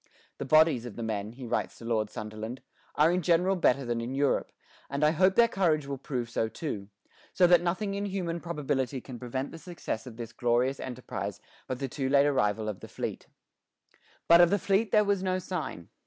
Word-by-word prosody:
"The - - -3
bodies 155 -4 +4
of 115 - -9
the 115 - -5
men," 110 -1 -3
he 130 +1 -9
writes 115 - -2
to 115 - -11
Lord 110 -2 0
Sunderland, 110 +5 -6 0.3
"are 155 +3 +5
in 180 +1 +1
general 180 +3 +3
better 140 -6 +2
than 120 -1 -1
in 125 +3 -4
Europe, 140 0 +1 0.4
and 140 +2 -2
I 150 - +5
hope 185 +4 +3
their 235 0 +6
courage 165 -9 +1
will 140 -1 -5
prove 125 -3 -3
so 115 -1 -1
too; 105 -9 -5 0.4
so 185 - +5
that 175 -1 +6
nothing 190 +4 -1
in 200 +1 -2
human 175 -4 -2
probability 145 -5 -2
can 125 -1 -9
prevent 130 +2 -4
the 165 - -9
success 165 - -5
of 115 -3 -10
this 120 -1 -7
glorious 120 +3 +1
enterprise 125 -1 -5 0.3
but 130 - -3
the 135 +1 -3
too 135 0 -3
late 140 0 +5
arrival 110 -6 +1
of 105 -3 -4
the - - -10
fleet." - - -5 1.0
But 170 +1 +8
of 175 - +6
the 205 - +3
fleet 200 +2 +1
there 210 -1 +5
was 200 -2 +1
no 185 -1 0
sign. 170 - -5
140 Hz, 210 wpm, -29 LUFS, 120-175 Hz, 1.0 s, But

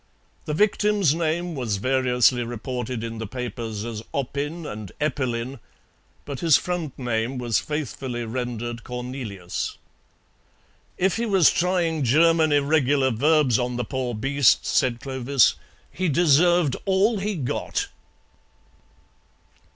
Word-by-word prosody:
The 150 - -2
victim's 210 -3 +2
name 170 +1 -1
was 120 -8 -2
variously 125 +1 +2
reported 120 0 -4
in 115 -1 -5
the 110 - -4
papers 115 -2 -5
as 115 -2 -5
Oppin 145 +5 -3
and 105 -8 -7
Eppelin, 130 -3 -2 0.7
but 140 -3 -6
his 165 -2 +5
front 175 -6 -4
name 120 0 -2
was 120 -3 +1
faithfully 135 -5 -4
rendered 120 0 -4
Cornelius. 125 -7 -5 1.2
"If 190 +3 +1
he 235 0 -1
was 190 -6 +5
trying 170 -3 0
German 160 +5 +4
irregular 145 -2 +2
verbs 140 0 +3
on 125 0 -2
the 120 -1 -2
poor 130 -1 -3
beast," 135 +3 +3
said 120 -2 +1
Clovis, 130 -1 +2 0.4
"he 185 -1 -1
deserved 170 0 +4
all 200 +3 +2
he 205 +1 -2
got." 135 -7 -2
130 Hz, 120 wpm, -24 LUFS, 120-160 Hz, 1.2 s, his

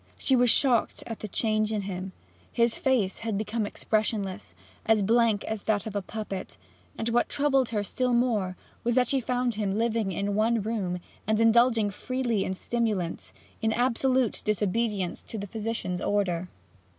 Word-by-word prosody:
She 265 - +3
was 245 -1 +4
shocked 240 0 +3
at 225 - -6
the 215 - -5
change 215 +1 +1
in 215 -2 0
him. 190 -1 -5 0.4
His 235 -1 +1
face 240 -8 +1
had 225 -3 -2
become 215 +1 -2
expressionless, 205 - -2 0.3
as 220 -2 +3
blank 225 0 +3
as 220 -2 -3
that 210 -2 +1
of 215 -2 -6
a 205 - 0
puppet, 200 -1 -6 0.4
and 225 - -1
what 240 +1 +2
troubled 275 -3 +2
her 210 -3 -1
still 250 +5 -1
more 220 -7 +1 0.3
was 235 0 +1
that 250 -2 +4
she 275 - +3
found 250 0 0
him 205 -2 -1
living 225 -3 0
in 200 +3 -1
one 220 +1 +2
room, 200 -5 -2 0.3
and 215 0 +2
indulging 230 -2 +4
freely 240 -1 -1
in 190 - -2
stimulants, 210 -6 -2 0.3
in 220 - +2
absolute 255 0 +1
disobedience 210 -2 0
to 225 - -8
the 200 - -4
physician's 215 -3 -3
order. 185 -4 0
220 Hz, 165 wpm, -27 LUFS, 200-235 Hz, 0.4 s, was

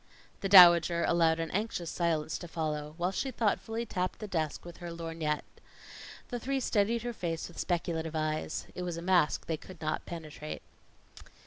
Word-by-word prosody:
The 195 - -2
Dowager 175 -3 +8
allowed 165 -1 +3
an 165 -1 -3
anxious 195 -4 -2
silence 160 -3 -1
to 175 - -8
follow, 155 -2 -3
while 180 +2 0
she 265 - -2
thoughtfully 225 -1 -1
tapped 185 -4 -2
the 215 - -6
desk 160 -6 -2
with 175 -1 -10
her 175 -1 -7
lorgnette. 165 -2 -3 0.9
The 245 - -3
three 270 +3 -1
studied 230 -1 +1
her 240 0 -3
face 165 -6 -3
with 175 - -11
speculative 165 -2 -1
eyes. 155 0 -2
It - - -6
was 175 -2 -3
a - - -5
mask 175 -4 +2
they 160 - -2
could 180 +2 -13
not 155 -1 -3
penetrate. 155 -2 -7
170 Hz, 175 wpm, -31 LUFS, 160-190 Hz, 0.9 s, Dowager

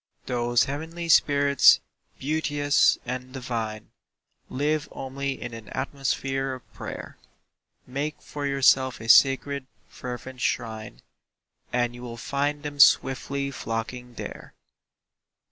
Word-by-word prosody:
Those 120 -1 +2
heavenly 160 +4 -5
spirits, 140 -2 +6 0.4
beauteous 145 0 +2
and 130 0 -5
divine, 115 -5 -4 0.6
Live 150 +3 -1
only 135 +1 -4
in 120 -1 -6
an 115 -2 -9
atmosphere 135 -1 -2
of 130 - -16
prayer; - - -8 0.7
Make 145 +4 -4
for 145 -1 -5
yourself 135 -1 +3
a 110 - -8
sacred, 135 +2 +5 0.2
fervent 125 +1 -8
shrine, 110 -3 -3 0.7
And 120 -1 0
you 120 - -10
will 120 -1 -7
find 145 +4 -2
them 145 -1 -6
swiftly 140 +1 +4
flocking 120 0 -5
there. - - -8
135 Hz, 110 wpm, -26 LUFS, 125-140 Hz, 0.7 s, spirits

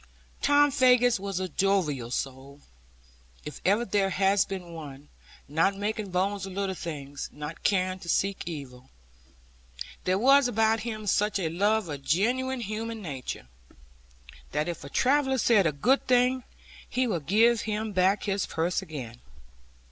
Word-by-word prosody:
Tom 290 0 +4
Faggus 250 -4 +4
was 195 -1 -3
a 185 - -2
jovial 165 -9 0
soul, 135 +3 -5 0.8
if 150 - -8
ever 210 +5 +2
there 195 -1 +1
has 195 +1 +2
been 180 -3 -7
one, 145 -3 -10 0.4
not 165 +7 +1
making 210 0 -3
bones 195 +2 -1
of 190 - -8
little 195 0 -2
things, 145 -6 -6
nor 150 +1 -6
caring 185 -1 +1
to 170 - -9
seek 195 +3 0
evil. 135 -5 -8 1.2
There 185 +1 +2
was 275 +4 +5
about 225 -1 +2
him 215 -1 -5
such 210 +1 +1
a 175 -5 -1
love 205 +4 +1
of 145 -3 -6
genuine 245 - 0
human 225 +1 -4
nature, 135 - -6 1.1
that 150 +2 0
if 170 -2 -5
a 140 - -8
traveller 265 - +2
said 220 -7 +4
a - - +1
good 240 - +1
thing, 250 0 +3 0.4
he 255 +1 +1
would 170 - -3
give 225 +5 +4
him 215 0 -3
back 190 +1 +2
his 200 -1 -1
purse 170 +2 -1
again. 120 -6 -8
195 Hz, 150 wpm, -27 LUFS, 160-220 Hz, 1.2 s, was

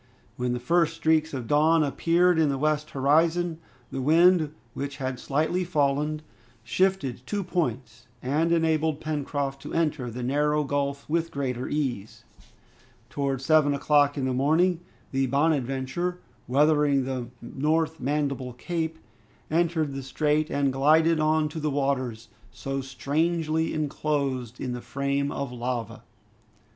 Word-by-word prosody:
When 125 0 -1
the 125 - -2
first 165 +5 +2
streaks 160 -1 +2
of 130 -4 -4
dawn 155 +4 +4
appeared 165 +5 +2
in 155 -2 +3
the 135 - -1
western 150 0 -1
horizon, 165 +3 +2 0.3
the 135 - -3
wind, 165 +2 +4 0.2
which 140 0 -5
had 130 -2 -3
slightly 160 +6 0
fallen, 150 -2 0 0.4
shifted 135 - 0
two 205 -1 -2
points, 130 -11 -3
and 150 +7 0
enabled 160 -2 +1
Pencroft 145 -3 -3
to - - -7
enter 150 -6 0
the 120 +2 -6
narrow 150 +3 +1
gulf 140 0 -2
with 165 +1 0
greater 130 -4 -3
ease. 130 -9 -3 0.9
Towards 135 -2 -2
seven 150 -2 +4
o'clock 145 0 +3
in 135 - -1
the 130 - 0
morning, 160 +7 +2 0.3
the 135 0 +1
"Bonadventure," 140 +4 0 0.3
weathering 145 0 +3
the 130 -2 -3
North 155 +6 -1
Mandible 140 -2 -2
Cape, 160 +4 -3 0.5
entered 160 -3 +1
the 135 - -4
strait 150 +3 0
and 140 -2 0
glided 155 +4 +4
on 155 0 +2
to 160 - -6
the 155 0 -1
waters, 130 -5 -2 0.2
so 135 +3 -4
strangely 160 +4 -1
enclosed 140 -5 -2
in 125 -2 -3
the 125 - -5
frame 140 +3 -1
of 140 -2 -4
lava. 120 -2 -4
145 Hz, 135 wpm, -26 LUFS, 135-160 Hz, 0.9 s, dawn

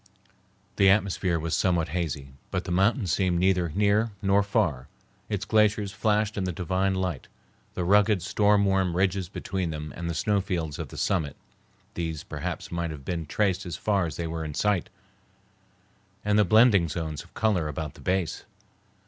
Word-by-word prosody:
The 100 -1 +6
atmosphere 95 -3 +2
was 80 0 -1
somewhat 85 -3 +1
hazy, 75 -6 -3 0.2
but - - -2
the 90 - -5
mountain 100 +5 +2
seemed 90 +1 +1
neither 90 -1 +2
near 105 +3 +3
nor 100 +1 +4
far. 95 - 0 0.4
Its 100 -2 -2
glaciers 105 -1 +2
flashed 105 0 0
in 100 - 0
the 90 - -1
divine 95 +2 0
light. 90 -7 -3 0.5
The 90 - -1
rugged, 100 0 +3
storm 105 +1 +3
worn 95 -2 +2
ridges 95 0 0
between 95 -3 -3
them 75 -1 -6
and 85 0 -4
the 85 - -3
snowfields 90 -4 -1
of - - -4
the - - -11
summit, 80 -8 0 0.6
these 80 -3 -4
perhaps - - -5
might 85 -1 -2
have 75 -4 -8
been 85 -3 -3
traced 95 +2 0
as 85 -3 -5
far 100 -5 +1
as 80 - -6
they 85 - -3
were 80 0 -4
in 75 -2 -6
sight, 105 -4 +1 1.4
and 105 0 +3
the 105 - +5
blending 105 -4 +5
zones 80 -2 -4
of - - -22
color 100 -8 +1
about 75 0 -4
the - - -15
base. 90 -3 -1
95 Hz, 175 wpm, -27 LUFS, 85-100 Hz, 1.4 s, The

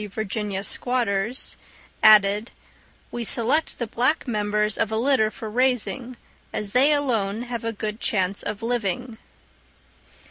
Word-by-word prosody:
_ - - -15
Virginia 205 -1 -3
squatters) 235 0 0 0.5
added, 210 +1 +6 0.6
"we 240 - -4
select 245 +8 +1
the 240 - -2
black 255 +7 0
members 210 -2 0
of 220 - -1
a 220 - 0
litter 240 -2 +3
for 220 - -8
raising, 250 +1 0 0.3
as 205 -2 -4
they 265 +6 +4
alone 230 -7 0
have 240 -2 -5
a 230 - -1
good 215 0 -5
chance 195 -3 0
of 210 - -5
living." 230 0 -2
225 Hz, 135 wpm, -24 LUFS, 210-245 Hz, 0.6 s, added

